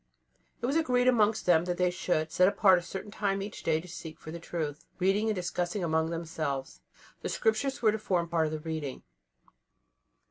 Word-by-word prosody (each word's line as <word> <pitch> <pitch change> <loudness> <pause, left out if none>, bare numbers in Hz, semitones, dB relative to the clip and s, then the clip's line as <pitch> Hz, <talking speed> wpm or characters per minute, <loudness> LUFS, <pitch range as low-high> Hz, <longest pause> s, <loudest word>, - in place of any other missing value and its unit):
It - - +2
was 270 +4 0
agreed 250 -6 +2
amongst 220 -3 +3
them 170 -1 +4
that 175 -1 -2
they 180 -1 +2
should 175 -3 -1
set 185 - +5
apart 190 -2 +5
a - - -8
certain 190 +4 -7
time 200 -2 0
every 200 +1 -3
day 160 -6 -1
to 175 - -10
seek 160 -2 -8
for 155 - -9
the 170 - -6
truth, 155 -3 -4
reading 195 +4 +2
and 215 - +1
discussing 180 +1 -2
among 160 -1 +1
themselves. 160 -5 -4 0.4
The - - -3
Scriptures 245 +5 0
were 215 - +6
to 220 - -3
form 180 -5 0
part 165 -2 +1
of - - -4
the 155 - -3
reading. 155 -4 -4
180 Hz, 200 wpm, -30 LUFS, 160-210 Hz, 0.4 s, were